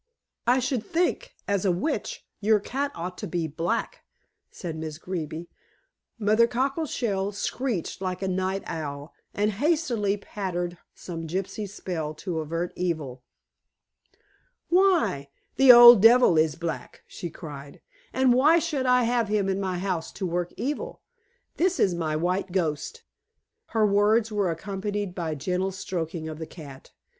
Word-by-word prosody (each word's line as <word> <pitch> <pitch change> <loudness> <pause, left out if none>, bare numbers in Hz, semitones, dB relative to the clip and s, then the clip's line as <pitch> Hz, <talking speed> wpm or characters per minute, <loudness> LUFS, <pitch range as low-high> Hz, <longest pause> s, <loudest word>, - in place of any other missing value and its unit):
"I 245 +2 +5
should 255 -3 -1
think, 370 - -1
as 200 -2 0
a 195 - +3
witch, 180 - -3
your 215 +1 +3
cat 275 +7 -3
ought 180 +2 -6
to - - -4
be 170 -2 -2
black," 165 +8 -2 0.5
said 170 -3 -6
Miss 155 -1 -6
Greeby. 170 -2 -5 0.7
Mother 215 +1 +4
Cockleshell 240 -7 -1
screeched 205 -3 -3
like 185 0 -3
a - - 0
night 190 +1 -1
owl 145 -2 -6 0.2
and 210 +1 +1
hastily 235 -5 0
pattered 180 -4 -4 0.2
some 165 -2 -7
gypsy 195 +4 -3
spell 160 -6 -4
to 170 0 -4
avert 165 +3 -3
evil. 155 -8 -3 1.5
"Why, 340 - +3 0.3
the 270 -1 +9
old 240 -3 +10
devil 230 -4 +7
is 155 -1 +3
black," 170 -1 -6
she 175 - -7
cried. 145 -4 -10 0.3
"And 260 -1 +3
why 295 +7 +5
should 305 -6 -1
I 250 0 +4
have 235 -1 +1
him 205 -1 +1
in 195 0 0
my 185 -2 -2
house 180 -3 -2
to 190 - -4
work 175 0 -2
evil? 300 - -4 0.5
This 370 +1 +1
is 185 - +3
my 160 -3 -2
white 180 +4 -1
ghost." 165 -5 -2 0.6
Her 220 -2 +2
words 210 +2 +3
were 205 -3 +1
accompanied 200 +3 -3
by 170 -3 -3
a - - -4
gentle 180 +6 -1
stroking 170 -4 -4
of 155 0 -7
the 160 - -5
cat. 140 -5 -12
190 Hz, 150 wpm, -26 LUFS, 170-235 Hz, 1.5 s, old